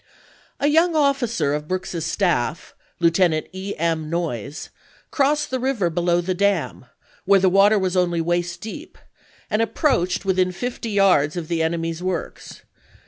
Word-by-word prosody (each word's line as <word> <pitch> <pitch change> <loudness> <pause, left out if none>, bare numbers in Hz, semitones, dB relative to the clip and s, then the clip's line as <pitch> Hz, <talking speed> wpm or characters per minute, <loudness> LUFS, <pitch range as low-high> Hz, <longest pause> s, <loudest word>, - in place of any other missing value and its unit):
A - - 0
young 325 +3 +3
officer 245 - +1
of 150 0 -3
Brooks's 180 -2 -3
staff. 170 -6 -1 0.3
Lieutenant 170 -1 +2
E. 190 +2 -5
M. 160 -1 -1
Noyes, 150 -5 -4 0.4
crossed 295 +1 +1
the 260 - -1
river 240 -9 0
below 175 +1 +1
the 185 +2 -2
dam, 200 +2 -1 0.4
where 200 -1 +5
the 190 0 +3
water 200 +3 +5
was 190 -2 -1
only 175 -2 +1
waist 175 +1 -1
deep, 220 - -9 0.5
and 210 - 0
approached 205 - 0
within 185 -1 +1
fifty 235 +4 -5
yards 185 -7 +3
of 165 -3 -5
the 165 -1 0
enemy's 165 0 -2
works. 185 -2 -5
180 Hz, 145 wpm, -22 LUFS, 170-210 Hz, 0.5 s, where